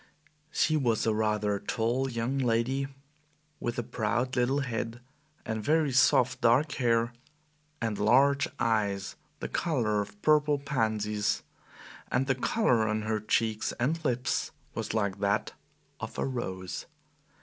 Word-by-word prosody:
She 155 -1 +2
was 120 -6 +1
a 110 - +2
rather 105 -1 0
tall 120 +6 0
young 120 +3 -1
lady 125 +2 +1 0.7
with 120 - -3
a 120 - -1
proud 115 +4 -1
little 130 +3 +2
head, 115 -2 -3 0.5
and 110 -1 -3
very 155 +2 +2
soft 130 0 +4
dark 125 +6 +4
hair, 115 -1 +1 0.7
and 110 -3 -2
large 135 +6 +4
eyes 100 -4 0 0.3
the - - -2
color 115 -10 0
of 105 0 -8
purple 150 -1 +4
pansies, 110 -7 0 0.7
and 130 +2 +2
the 135 - +2
color 125 - +2
on 110 0 -1
her 110 0 0
cheeks 110 +1 0
and 155 +8 -1
lips 125 -3 0 0.2
was - - -3
like 100 -3 0
that 100 0 0 0.5
of - - -6
a - - 0
rose. 95 -8 -4
115 Hz, 135 wpm, -29 LUFS, 110-135 Hz, 0.7 s, soft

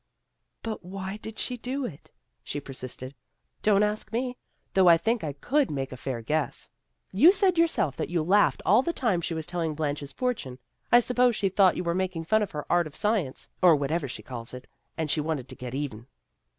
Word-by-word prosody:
" - - -52
But 220 -4 -4
why 190 +2 -5
did 220 0 -9
she 250 - -2
do 255 +3 -3
it? 155 -12 -9 0.2
" 60 0 -50
she 145 - -4
persisted. 130 -1 -7 0.3
" - - -49
Don't 210 -1 +4
ask 210 +1 -1
me. 250 +2 -2 0.4
Though 190 -1 +5
I 170 -1 +8
think 225 +6 0
I 150 - -2
could 275 - +1
make 135 -2 -3
a - - -6
fair 125 -2 -4
guess. 150 +4 -2 0.4
You 290 - +7
said 380 -3 +2
yourself 320 - +2
that - - -2
you 170 -2 0
laughed 200 +5 +3
all 210 +6 +6
the 340 +5 -2
time 215 - +1
she 165 0 -2
was 160 -1 -3
telling 170 -3 -2
Blanche's 145 -2 -3
fortune. 235 - -3 0.3
I 240 - +8
suppose 250 0 +2
she 195 - +1
thought 190 -1 +4
you - - -2
were 170 -1 0
making 185 -2 -2
fun 215 +6 +2
of 210 - -1
her 150 -1 -5
art 175 -2 +2
or - - -11
science, 205 -11 -1
or 175 -3 +7
whatever 145 +2 -1
she 130 - -7
calls 120 -1 -7
it, 125 - -10 0.3
and 160 -3 -1
she 155 - +1
wanted 150 -4 -3
to - - -7
get 125 0 -6
even." 130 -5 -4
175 Hz, 220 wpm, -27 LUFS, 145-220 Hz, 0.4 s, I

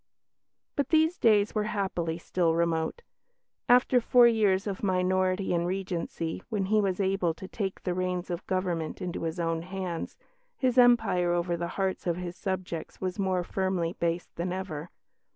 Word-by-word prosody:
But 285 - 0
these 320 +2 +3
days 215 -2 +4
were 215 -1 0
happily 180 -6 -2
still 170 -1 0
remote. 170 - 0 0.7
After 250 0 +5
four 245 +1 +6
years 210 -4 +2
of 200 -2 -4
minority 185 0 +1
and 170 0 +1
Regency, 180 -3 -3
when 210 -4 -1
he 215 - +5
was 190 -2 -1
able 190 -4 +1
to 190 +2 -9
take 195 -1 -4
the 180 - -1
reins 180 0 -2
of 175 +1 -5
government 180 -4 -2
into 180 -2 -4
his 165 +1 -3
own 165 -1 0
hands, 180 -1 -5 0.4
his 255 -1 +2
empire 210 -8 +4
over 175 0 0
the 170 0 -3
hearts 190 -2 -1
of 170 -1 +1
his 180 -1 -5
subjects 185 -4 -4
was 185 +1 -3
more 185 -2 +1
firmly 185 -2 -1
based 170 +1 -2
than 175 +2 -2
ever. 180 -4 -5
185 Hz, 165 wpm, -28 LUFS, 170-200 Hz, 0.7 s, four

